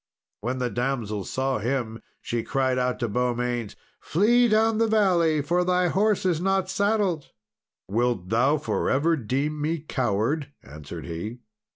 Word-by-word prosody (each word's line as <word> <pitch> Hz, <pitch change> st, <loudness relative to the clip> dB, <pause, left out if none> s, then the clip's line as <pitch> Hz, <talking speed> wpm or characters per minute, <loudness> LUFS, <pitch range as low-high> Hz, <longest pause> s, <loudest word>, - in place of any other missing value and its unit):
When 125 Hz, +5 st, -3 dB
the 125 Hz, -2 st, -1 dB
damsel 120 Hz, -6 st, -2 dB
saw 130 Hz, -2 st, -1 dB
him, 115 Hz, -1 st, -2 dB, 0.2 s
she 120 Hz, -1 st, -2 dB
cried 130 Hz, +1 st, 0 dB
out 125 Hz, 0 st, 0 dB
to 120 Hz, -, +1 dB
Beaumains, 120 Hz, 0 st, -1 dB, 0.2 s
"Flee 240 Hz, +8 st, +3 dB
down 220 Hz, 0 st, +3 dB
the 230 Hz, -, +3 dB
valley, 175 Hz, -8 st, +3 dB
for 175 Hz, +5 st, +1 dB
thy 180 Hz, 0 st, +2 dB
horse 205 Hz, +2 st, +1 dB
is 175 Hz, -3 st, +1 dB
not 195 Hz, 0 st, +1 dB
saddled!" 200 Hz, -7 st, 0 dB, 0.6 s
"Wilt 115 Hz, -3 st, 0 dB
thou 130 Hz, +7 st, +3 dB
for 150 Hz, -, -1 dB
ever 160 Hz, +5 st, +2 dB
deem 140 Hz, +4 st, -2 dB
me 160 Hz, +3 st, 0 dB
coward?" 135 Hz, 0 st, -1 dB
answered 75 Hz, +3 st, -9 dB
he. 105 Hz, +9 st, -6 dB
135 Hz, 150 wpm, -25 LUFS, 120-180 Hz, 0.6 s, Flee